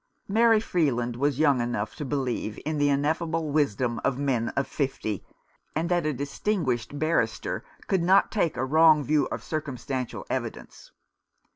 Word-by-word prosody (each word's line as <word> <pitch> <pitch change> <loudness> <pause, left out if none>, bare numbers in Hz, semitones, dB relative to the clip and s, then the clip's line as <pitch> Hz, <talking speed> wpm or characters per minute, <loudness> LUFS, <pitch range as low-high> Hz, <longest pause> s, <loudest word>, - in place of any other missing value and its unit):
Mary 225 +2 +4
Freeland 130 - 0
was 140 +1 0
young 140 -4 +3
enough 115 -3 -2
to - - -5
believe 130 -6 -2
in 155 -1 -1
the 145 0 +3
ineffable 160 +2 0
wisdom 125 -5 0
of 130 - +1
men 130 -5 0
of 140 - +2
fifty, 130 -7 -3 0.5
and 165 +2 0
that 175 -3 +1
a - - +1
distinguished 140 - -2
barrister 150 -7 0 0.2
could 190 -3 +1
not 185 +3 +4
take 175 -7 0
a 130 - 0
wrong 155 +1 +5
view 150 +1 +2
of - - -5
circumstantial 135 -4 -4
evidence. - - -5
145 Hz, 150 wpm, -26 LUFS, 125-160 Hz, 0.5 s, wrong